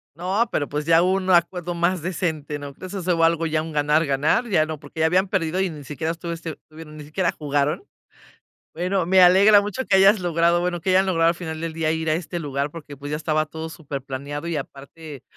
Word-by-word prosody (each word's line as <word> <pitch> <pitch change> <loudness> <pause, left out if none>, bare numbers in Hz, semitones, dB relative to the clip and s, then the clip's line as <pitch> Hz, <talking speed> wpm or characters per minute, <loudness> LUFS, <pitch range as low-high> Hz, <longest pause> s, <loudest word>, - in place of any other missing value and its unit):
No, 190 +8 0
pero 145 - -1
pues 150 +1 -3
ya 165 +1 +5
un 190 +1 0
acuerdo 175 0 +1
más 175 +1 0
decente, 160 -4 -3
¿no 145 -1 -8
crees?, 185 +6 -10
eso 195 - -4
es 165 - 0
algo 165 0 +1
ya 155 -1 0
un 160 0 -7
ganar 150 +2 +2
ganar, 145 - +1
ya 155 -5 +3
no, 155 -1 -6
porque 160 +1 -7
ya - - +4
habían 185 +4 +2
perdido 185 -1 -1
y 190 - 0
ni 150 -3 -9
siquiera 155 +4 -3
estuviste, 170 -1 -6
bueno, 155 0 -11
ni 155 -1 -9
siquiera 165 +4 -1
jugaron. 145 - -1 0.9
Bueno, 180 +1 -1
me 185 +1 +5
alegra 200 +3 +7
mucho 210 +6 -4
que 190 - +4
hayas 195 +1 +5
logrado, 170 0 +2
bueno, 175 -1 -2
que 190 - 0
hayan 190 +1 +4
logrado 165 -3 +2
al 170 - -2
final 160 -2 -6
del 165 -1 -3
día 160 -1 -1
ir 160 -1 -2
a - - +3
este 175 +1 -4
lugar, 145 -2 -3
porque 150 -3 -10
pues 145 +1 -8
ya 150 - -1
estaba 155 0 0
todo 160 +1 -7
superplaneado 145 +1 -6
y 165 - -2
aparte 140 +1 -9
165 Hz, 225 wpm, -23 LUFS, 150-180 Hz, 0.9 s, alegra